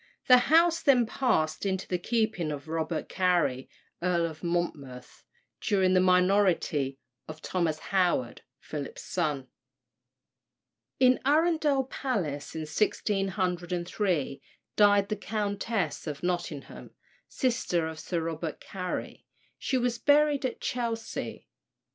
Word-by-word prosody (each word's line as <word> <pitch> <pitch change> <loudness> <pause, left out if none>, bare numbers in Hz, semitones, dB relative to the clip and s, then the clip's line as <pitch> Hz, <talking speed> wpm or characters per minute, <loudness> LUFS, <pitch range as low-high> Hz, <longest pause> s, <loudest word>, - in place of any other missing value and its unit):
The 250 -1 +8
house 330 +1 +5
then 255 -5 +4
passed 215 -11 0
into 190 -1 -1
the 180 - -1
keeping 215 -6 0
of 145 +1 -6
Robert 160 0 -2
Cary, 175 -9 +1 0.3
Earl 175 -1 +1
of 160 0 -7
Monmouth, 150 -7 -4 0.4
during 190 -2 +2
the 185 - +5
minority 180 -7 +2 0.3
of 155 0 -8
Thomas 165 -2 -1 0.2
Howard, 175 -10 +1 0.2
Philip's 145 -2 -6
son. 150 -7 -2 1.5
In 255 -1 +5
Arundel 300 -1 +3
Palace, 195 - -3
in 160 - -3
1603, 180 -3 -1 0.3
died 205 -1 +5
the 215 - 0
Countess 205 -6 -2
of 150 0 -5
Nottingham, 175 -5 -4 0.3
sister 235 - 0
of 160 -1 -7
Sir 170 +1 -2
Robert 160 -1 -4
Cary; 180 -2 -6 0.3
she 265 - 0
was 240 -1 0
buried 290 +2 +4
at 245 - -8
Chelsea. 230 -2 -4
185 Hz, 110 wpm, -28 LUFS, 160-225 Hz, 1.5 s, The